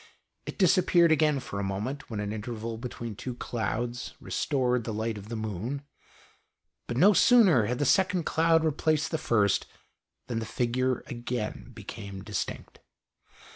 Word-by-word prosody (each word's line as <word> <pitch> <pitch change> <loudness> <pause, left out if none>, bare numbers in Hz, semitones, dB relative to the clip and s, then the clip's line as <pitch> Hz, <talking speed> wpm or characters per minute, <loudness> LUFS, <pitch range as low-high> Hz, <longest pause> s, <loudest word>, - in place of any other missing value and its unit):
It - - -6
disappeared 175 -3 +4
again 150 -2 +3
for 100 -5 -6
a - - -1
moment, 105 +9 -4
when 110 -3 -4
an 105 0 -3
interval 110 +1 -5
between 115 -2 -6
two 125 +4 -6
clouds 120 +1 -3
restored 125 -3 0
the 115 - -4
light 110 +1 -2
of 105 +1 -9
the 115 - -4
moon; 110 +6 -4 1.0
but 120 - -3
no 200 +8 +7
sooner 185 - +5
had 125 - -1
the 145 - 0
second 185 +2 +3
cloud 165 0 +3
replaced 155 0 +1
the 160 - -1
first 105 -9 +2 0.6
than 115 -2 -2
the 110 - -4
figure 125 0 0
again 120 -1 -4
became 100 -3 -8
distinct. 105 -2 -5
120 Hz, 150 wpm, -28 LUFS, 110-150 Hz, 1.0 s, no